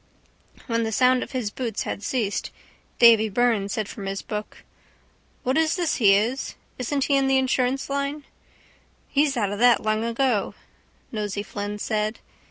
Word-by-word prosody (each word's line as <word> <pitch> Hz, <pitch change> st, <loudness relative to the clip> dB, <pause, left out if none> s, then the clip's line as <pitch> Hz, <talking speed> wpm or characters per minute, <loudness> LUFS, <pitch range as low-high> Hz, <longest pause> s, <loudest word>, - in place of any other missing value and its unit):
When 230 Hz, -2 st, 0 dB
the 225 Hz, -1 st, -1 dB
sound 255 Hz, +2 st, +3 dB
of -, -, -5 dB
his 240 Hz, -5 st, -2 dB
boots 230 Hz, -3 st, -3 dB
had -, -, -4 dB
ceased 215 Hz, -2 st, -2 dB, 0.5 s
Davy 225 Hz, -2 st, +6 dB
Byrne 220 Hz, -2 st, +1 dB
said 215 Hz, 0 st, -2 dB
from 200 Hz, -3 st, -7 dB
his 195 Hz, 0 st, -4 dB
book: 210 Hz, -1 st, -6 dB, 0.8 s
—What 260 Hz, +3 st, +1 dB
is 320 Hz, 0 st, +2 dB
this 350 Hz, -4 st, 0 dB
he 200 Hz, -5 st, +6 dB
is? 235 Hz, +7 st, -1 dB, 0.2 s
Isn't 275 Hz, +3 st, -1 dB
he 280 Hz, -, +2 dB
in 270 Hz, -1 st, +2 dB
the 270 Hz, 0 st, +3 dB
insurance 260 Hz, 0 st, 0 dB
line? 280 Hz, +1 st, -2 dB, 0.8 s
—He's 285 Hz, -2 st, +1 dB
out 205 Hz, -4 st, 0 dB
of 205 Hz, -, -4 dB
that 245 Hz, 0 st, +5 dB
long 215 Hz, 0 st, 0 dB
ago, 235 Hz, -2 st, 0 dB, 0.6 s
Nosey 205 Hz, -2 st, -3 dB
Flynn 205 Hz, 0 st, -5 dB
said. 215 Hz, +1 st, -1 dB
230 Hz, 165 wpm, -24 LUFS, 210-265 Hz, 0.8 s, Davy